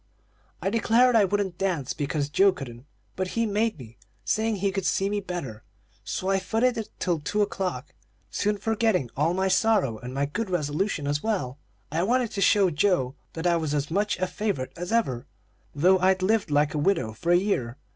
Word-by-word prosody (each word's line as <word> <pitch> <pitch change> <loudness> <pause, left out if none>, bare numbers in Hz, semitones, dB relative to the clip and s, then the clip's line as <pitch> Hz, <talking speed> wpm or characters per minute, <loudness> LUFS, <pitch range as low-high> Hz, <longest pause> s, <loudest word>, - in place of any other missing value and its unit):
"I 195 - 0
declared 230 +2 +4
I 215 -3 +6
wouldn't 195 -2 -2
dance, 175 -9 -1
because 145 0 -2
Joe 195 +7 +4
couldn't; 130 -6 -9 0.3
but 185 0 -2
he 230 - +2
made 215 0 0
me, 120 -4 -13 0.3
saying 220 0 +1
he 195 0 0
could 190 -2 -2
see 195 +2 +1
me 205 - 0
better; 170 - -6 0.4
so 190 - -3
I 195 - +2
footed 225 +7 +1
it 225 -2 -4
till 175 -3 0
two 210 +8 0
o'clock, 190 - -4 0.4
soon 210 0 0
forgetting 215 - 0
all 160 +5 +1
my 190 +1 +1
sorrow 190 - +2
and 125 - -7
my 140 +2 0
good 190 +9 -3
resolutions 155 -1 -1
as 145 +1 0
well. 165 - -2 0.3
I 160 +3 0
wanted 240 +4 +1
to 200 - -3
show 195 -2 +4
Joe 150 -5 +1 0.2
that 165 +1 -5
I 170 -1 +3
was 155 -2 -2
as 145 +1 -2
much 205 +4 0
a 185 - 0
favorite 190 -9 -3
as 175 +3 -5
ever, 135 - 0 0.5
though 185 +6 +4
I'd 190 0 +2
lived 215 0 +2
like 145 0 +2
a 150 - -1
widow 145 - +1
for 170 +10 -2
a 175 - +6
year. 135 - -1
185 Hz, 195 wpm, -26 LUFS, 145-205 Hz, 0.5 s, I